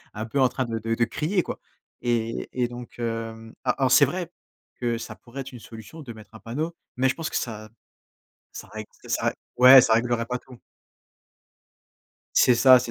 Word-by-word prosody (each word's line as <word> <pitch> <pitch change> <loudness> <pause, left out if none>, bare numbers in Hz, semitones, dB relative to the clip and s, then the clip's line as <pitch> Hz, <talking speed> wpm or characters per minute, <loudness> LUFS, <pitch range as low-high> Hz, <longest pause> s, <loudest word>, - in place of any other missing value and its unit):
un 110 +1 -4
peu 125 +5 -2
en 130 - +5
train 130 +1 -2
de 115 -1 -3
de 115 +1 -1
de 115 - +2
crier 165 - 0
quoi - - -6 0.4
et 115 -1 -1
et 125 -1 0
donc 120 0 -10
hem, 115 -1 -5
alors 130 0 +1
c'est 140 - +7
vrai 175 +4 -4 0.5
que 120 -1 0
ça - - -7
pourrait 125 +3 -9
être 135 +1 -8
une 120 - -10
solution 115 +9 -11
de 120 -5 -8
mettre 110 0 -15
un 110 - -11
panneau, 155 +9 -4 0.2
mais 130 +1 +3
je - - +1
pense 165 -1 -4
que - - -7
ça 110 -2 -4 0.8
ça - - -9
règle - - -8 0.2
ça - - -1
règle - - 0 0.2
ouais, 130 +1 +10
ça 110 - +3
réglerait 115 0 +1
pas 125 0 -2
tout. 125 -1 -15 1.8
C'est 125 -2 +6
ça, 130 0 +8
c'est 120 - -5
120 Hz, 200 wpm, -25 LUFS, 115-130 Hz, 1.8 s, ouais